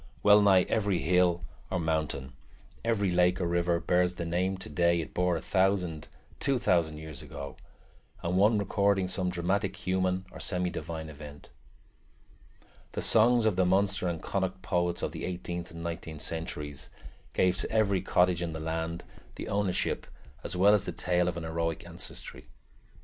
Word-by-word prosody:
Well 105 0 +7
nigh 95 -3 +6
every 100 -4 +1
hill 90 0 +2 0.3
or 95 - -1
mountain, 80 -5 -2 0.5
every 105 -5 +1
lake 90 0 +3
or 90 - 0
river, 85 0 +1
bears 90 +1 +2
the 85 - -4
name 90 +3 0
today 85 0 +1
it 80 - -5
bore 90 -1 +2
a - - -7
thousand, 95 -5 +1 0.3
two 140 -2 +1
thousand, 85 -8 +1
years 80 -1 -8
ago, - - -8 0.7
and 85 +2 0
one 105 +4 +5
recording 100 -1 +2
some 90 0 -1
dramatic 95 +3 -1
human 95 0 0
or - - -10
semi 90 -2 -1
divine 80 -1 -5
event. 75 -1 -11 1.4
The - - -2
songs 115 +1 +5
of 105 -5 +2
the 95 - +4
Munster 95 0 +2
and 85 -2 -2
Connacht 95 -1 -2
poets 85 -1 0
of - - -1
the - - -7
eighteenth 85 -1 -4
and 85 0 -8
nineteenth 80 -2 -5
centuries 75 -4 -5 0.4
gave 90 0 +2
to - - -3
every 100 -4 +2
cottage 90 -1 +2
in 85 -2 -2
the 80 - -4
land 80 +1 -3 0.3
the - - -6
ownership 100 -2 0 0.4
as 85 - -4
well 100 +3 +6
as 105 -1 +2
the - - -3
tale 90 0 +1
of 85 -1 -2
an 85 - -4
heroic 80 0 -2
ancestry. - - -8
90 Hz, 165 wpm, -29 LUFS, 85-95 Hz, 1.4 s, Well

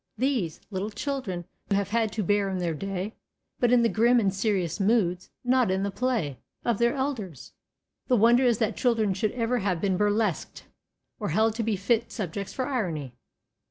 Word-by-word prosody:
These, 235 - -1
little 195 +2 -2
children 215 -6 -4 0.2
have 200 -1 +1
had 225 0 +1
to 215 - -1
bear 205 +1 +2
in 190 - -2
their 175 -2 -1
day, 195 +5 -4 0.5
but 245 -1 +3
in 245 -1 +5
the - - +5
grim 235 +2 +4
and 195 -4 +1
serious 195 -4 0
moods 195 -4 +1
not 250 -3 +3
in 190 +1 0
the 200 - -1
play 195 - -1 0.3
of 235 -4 +1
their 235 +3 +3
elders. 240 - -4 0.5
The 255 - +4
wonder 235 +4 +5
is 240 -3 +3
that 220 -2 0
children 225 -5 +2
should 200 +2 0
ever 245 0 0
have 190 -4 0
been 190 -1 +1
burlesqued, 210 -2 0 0.6
or - - -2
held 220 +7 +2
to 230 - -3
be 220 -1 0
fit 230 +4 0
subjects 200 -2 -4
for 260 - -2
irony. 170 - -2
210 Hz, 185 wpm, -27 LUFS, 190-235 Hz, 0.6 s, in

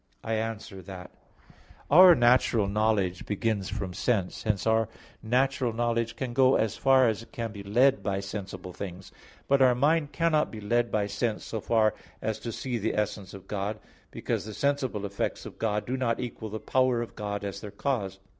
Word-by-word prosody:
I 115 - -2
answer 110 -3 -4
that, 90 -1 -9 0.8
Our 180 +3 +9
natural 120 -4 +3
knowledge 100 -3 0
begins 105 -1 -1
from 100 -3 -4
sense. 100 -1 -1
Hence 105 -3 -1
our 110 0 +2 0.3
natural 125 +1 +1
knowledge 115 0 -1
can 125 -1 -4
go 130 +1 +5
as 110 -1 +1
far 135 -2 +4
as 110 -1 0
it 115 - -15
can 115 -2 -4
be 100 -2 -8
led 120 +4 +3
by 95 0 -1
sensible 100 -2 -6
things. 95 -1 -8 0.4
But 140 0 +3
our 125 -2 +6
mind 145 +3 +2
cannot 155 0 +2
be 110 - -8
led 120 +3 0
by 105 -1 +1
sense 110 +1 -2
so 110 - -4
far 110 -1 +2 0.3
as 110 0 -3
to 115 +2 -5
see 120 +1 -3
the 110 - -1
essence 105 -2 -3
of 95 - -12
God; 105 +1 -3 0.3
because - - -3
the 110 -1 -8
sensible 140 -7 -1
effects 100 0 -3
of - - -10
God 105 -2 -1
do 125 - -2
not 120 -3 0
equal 115 -3 -5
the 110 +1 -5
power 125 +1 +1
of 115 - -10
God 100 -1 -4
as 100 0 -5
their 105 - -7
cause. 100 -3 -2
110 Hz, 190 wpm, -28 LUFS, 100-125 Hz, 0.8 s, Our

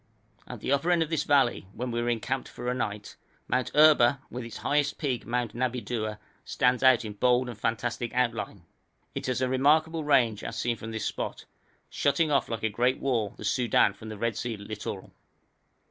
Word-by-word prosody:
At - - -8
the - - -2
upper 140 +5 +2
end 175 -2 +4
of 160 - -8
this 160 - 0
valley, 135 -9 +2
where 125 +3 -4
we 120 0 -1
encamped 130 +3 -2
for 120 - -7
a 125 - +1
night, 105 -4 -4 0.3
Mount 125 0 0
Erba, 145 -4 +6
with 125 0 -5
its 115 -1 -8
highest 145 0 +1
peak, 130 -5 -2
Mount 120 -1 -1
Nabidua, 120 -3 -2 0.3
stands 125 0 +1
out 130 -3 +5
in 105 - -5
bold 125 +3 +2
and 120 - -6
fantastic 115 +2 -2
outline. 115 -6 -1 0.5
It - - -4
is 130 0 -1
a 130 - +2
remarkable 155 +5 +2
range 125 -8 +2
as 115 - -5
seen 120 0 0
from 115 0 -8
this 110 -1 -4
spot, - - -4 0.4
shutting 150 +2 +1
off 140 - +2
like 115 -1 -4
a - - +3
great 125 +4 +1
wall 115 -7 -1
the 110 - -7
Soudan 115 -2 +3
from 110 +2 -10
the 110 - -7
Red 115 0 -1
Sea 120 -1 -3
littoral. 100 -2 -7
120 Hz, 190 wpm, -28 LUFS, 115-135 Hz, 0.5 s, Erba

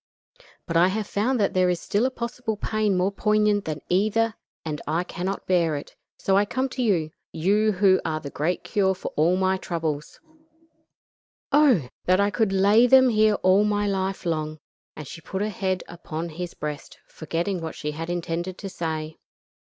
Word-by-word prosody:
But 165 - -4
I 175 +2 +6
have 210 +3 -1
found 230 +6 0
that 200 - +1
there 185 -1 +3
is 175 -1 0
still 215 +5 +1
a - - -1
possible 235 -3 -4
pain 215 -2 0
more 185 +2 +1
poignant 210 0 +2
than 150 -2 -4
either, 215 +4 +2 0.3
and 150 -2 -4
I 165 +4 0
cannot 185 +2 -4
bear 170 -4 +2
it; 145 - -7 0.2
so 190 - +1
I 200 - +5
come 260 +6 -2
to 255 - -4
you 175 -10 +1 0.2
you 210 +6 +2
who 190 0 +4
are 155 -1 -2
the 140 -2 -8
great 170 +5 -1
cure 190 -3 +1
for 185 - -5
all 165 +4 +3
my 190 0 +2
troubles. 160 -5 -4 1.3
Oh! 265 - +4 0.2
that 185 +1 +3
I 200 +1 +2
could 200 +1 +1
lay 200 +5 +5
them 260 0 +7
here 215 -2 +4
all 185 +2 +5
my 205 0 +1
life 190 -1 -2
long," 155 -2 -2 0.4
and 150 -2 -8
she 165 - -9
put 190 +5 -3
her 215 - -1
head 185 -2 -2
upon 170 -1 -6
his 175 +2 -6
breast, 150 -1 -6
forgetting 170 +3 -3
what 160 -1 -5
she 150 - -4
had 165 +3 -6
intended 175 +1 -3
to 195 - -6
say. 160 -3 -4
185 Hz, 185 wpm, -25 LUFS, 165-210 Hz, 1.3 s, them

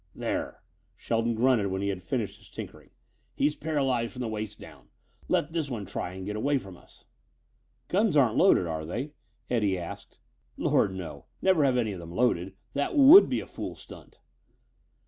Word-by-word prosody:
"There," - - -4 0.3
Shelton 115 0 -1
grunted 120 -3 +3
when 95 0 -2
he 100 - 0
had 95 -2 -3
finished 105 +4 -3
his - - -18
tinkering, - - -9 0.5
"he's 150 +2 +1
paralyzed 135 -6 -1
from 125 - -7
the 120 - -2
waist 110 -1 -5
down. - - -14 0.4
Let 160 +2 0
this 160 -4 -1
one 110 -6 -4
try 90 - -5
and 95 0 -7
get 105 +1 -4
away 140 +6 +1
from 95 -8 -8
us." - - -20 0.8
"Guns 195 -4 +2
aren't 125 -5 +4
loaded, 185 - +5
are 80 -1 -3
they?" 120 - -4 0.4
Eddie 105 -6 +1
asked. 85 -1 -8 0.4
"Lord, 95 - +2
no! 80 -7 -7
Never 185 -5 +3
have 130 -2 +3
any 115 -3 0
of 95 - -6
them 85 0 -9
loaded. 95 -6 +1 0.2
That 145 - -1
would 295 +8 +9
be - - 0
a - - -9
fool - - -7
stunt." - - -13
115 Hz, 180 wpm, -28 LUFS, 95-140 Hz, 0.8 s, would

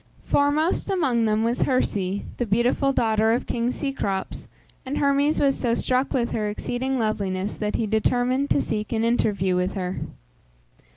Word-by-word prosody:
Foremost 300 +7 +1
among 265 - +1
them 215 0 +1
was 235 +2 0
Herse, 200 -7 0
the 245 - -1
beautiful 240 +6 +2
daughter 220 -3 +2
of 240 - -1
king 235 +1 -1
Cecrops, 255 -10 -3 0.4
and 270 +2 -4
Hermes 280 +2 +2
was 275 -1 +3
so 235 -2 0
struck 255 +2 0
with 240 -3 0
her 210 -2 -1
exceeding 250 +5 -2
loveliness 205 -3 -1
that 210 -1 -2
he 230 - 0
determined 245 +5 +1
to 280 - +2
seek 215 -1 -3
an 225 0 0
interview 205 -5 +1
with 180 +1 0
her. 185 -1 -3
235 Hz, 160 wpm, -24 LUFS, 210-265 Hz, 0.4 s, was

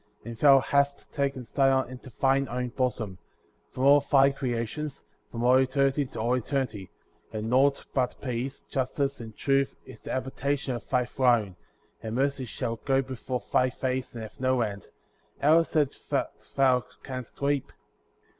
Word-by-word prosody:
And 115 0 -6
thou 135 +3 +6
hast 140 +1 0
taken 140 -3 -1
Zion 130 0 +1
to 130 - -13
thine 135 0 +3
own 125 +1 -2
bosom,* 115 -7 -2 0.5
from 130 - -4
all 140 +1 +7
thy 135 0 +4
creations, 135 +2 -4 0.2
from 115 0 -4
all 125 +1 +6
eternity 135 +1 +2
to - - -8
all 120 +3 +1
eternity; 125 -6 -2 0.4
and 110 +1 -3
nought 140 +2 +3
but 130 -2 0
peace, 125 0 -4
justice, 135 +1 -2
and 110 -2 -10
truth 135 -1 +1
is - - -12
the - - -6
habitation 135 +1 -2
of 120 - -7
thy 125 -2 +2
throne; 120 -7 +2 0.5
and 110 0 -4
mercy 135 0 0
shall 115 0 -3
go 135 +3 +1
before 130 -1 -4
thy 130 0 +4
face 130 0 -3
and 115 - -5
have 110 - -11
no 130 -1 +2
end; 100 -3 -3 0.5
how 155 +3 +6
is 165 - -3
it 150 -3 +2 0.6
thou 130 -2 +4 0.2
canst 130 -3 -7
weep? 140 -1 0
130 Hz, 160 wpm, -27 LUFS, 120-140 Hz, 0.6 s, all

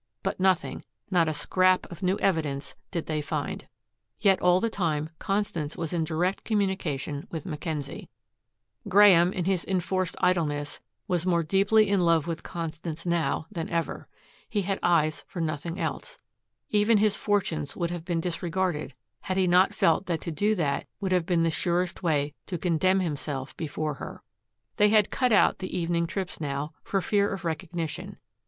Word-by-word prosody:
But - - -2
nothing, 185 -2 +1 0.3
not 175 -3 +4
a 155 - 0
scrap 185 +4 +2
of 175 - -9
new 185 +1 +1
evidence 150 -8 -1 0.2
did 170 -4 -3
they 155 -1 -1
find. 145 - -4 0.5
Yet 195 -3 +4
all 180 0 +5
the 230 - +1
time 160 -7 -1
Constance 195 -7 -2
was 165 -1 -3
in 165 -2 +1
direct 175 +4 -1
communication 180 - -1
with 165 +1 -5
Mackenzie. 150 -4 -5 0.8
Graeme, 185 -3 +7
in 180 -3 -2
his 190 -2 +1
enforced 185 -1 -1
idleness, 145 -5 0 0.3
was 175 0 0
more 170 -2 +3
deeply 200 +6 +4
in 200 0 +2
love 165 -3 +3
with 165 -1 -3
Constance 165 0 -5
now 170 -2 0
than 170 -5 -4
ever. 170 -1 -2 0.4
He 205 -2 0
had 195 +1 -1
eyes 155 -3 +2
for 180 - -7
nothing 165 +2 -3
else. - - -4 0.5
Even 210 +1 +4
his 210 0 +3
fortunes 165 -8 -1
would 170 -1 -2
have 175 -2 -4
been 170 -1 -1
disregarded, 170 -4 -2 0.2
had 185 - -3
he 190 - +4
not 180 +2 +5
felt 165 +4 +2
that 165 -3 -1
to 170 - -4
do 205 +7 +1
that 150 -7 -1
would 195 -2 -2
have 180 -2 +2
been 170 -2 +2
the 165 - +2
surest 175 +3 -1
way 150 -4 +1
to 180 - -3
condemn 185 +3 +2
himself 145 -5 -3
before 155 -1 -3
her. - - -9 0.5
They 210 0 +5
had 210 -1 +4
cut 250 -2 +1
out 210 - +4
the 185 -1 -4
evening 170 -1 0
trips 185 -2 -4
now, 145 +1 -3
for 195 -3 0
fear 200 +3 +2
of 190 -2 -5
recognition. 165 -1 -4
175 Hz, 170 wpm, -27 LUFS, 160-190 Hz, 0.8 s, Graeme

